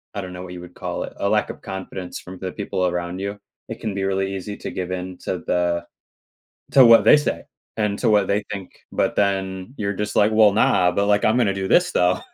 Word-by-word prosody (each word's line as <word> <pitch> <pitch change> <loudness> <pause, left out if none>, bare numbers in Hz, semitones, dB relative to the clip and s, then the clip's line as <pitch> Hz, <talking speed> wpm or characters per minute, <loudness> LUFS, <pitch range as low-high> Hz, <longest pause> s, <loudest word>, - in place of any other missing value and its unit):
I 100 - -2
don't 95 - -7
know 90 - -7
what 90 -1 -8
you 90 - -8
would 90 0 -12
call - - -4
it. - - -8
A - - 0
lack - - +1
of - - -8
confidence 95 -1 -6
from 90 0 -11
the 95 -1 -5
people 95 -3 -1
around 90 +1 -3
you. 100 +1 -4 0.3
It - - -7
can 110 - -3
be 95 0 -3
really 95 0 -1
easy 100 +2 -5
to - - -6
give 90 -1 -4
in 90 0 -5
to 90 - -3
the 85 -1 0 0.9
to 135 -2 +8
what 115 -1 +8
they - - +7
say, 150 - -2 0.3
and 105 -2 0
to - - +2
what 105 -3 +3
they 100 +1 0
think, 100 -3 -6 0.2
but - - 0
then 95 +1 -1
you're 100 -1 -1
just, 105 +2 -4
like, 105 +1 +4
"Well, 110 -2 +6
nah, 95 -3 +3
but, 100 +3 0
like, 105 0 +3
I'm 110 - +3
gonna 110 -6 +2
do 95 0 -3
this 175 - +3
though." 90 +1 +2
95 Hz, 245 wpm, -22 LUFS, 90-105 Hz, 0.9 s, to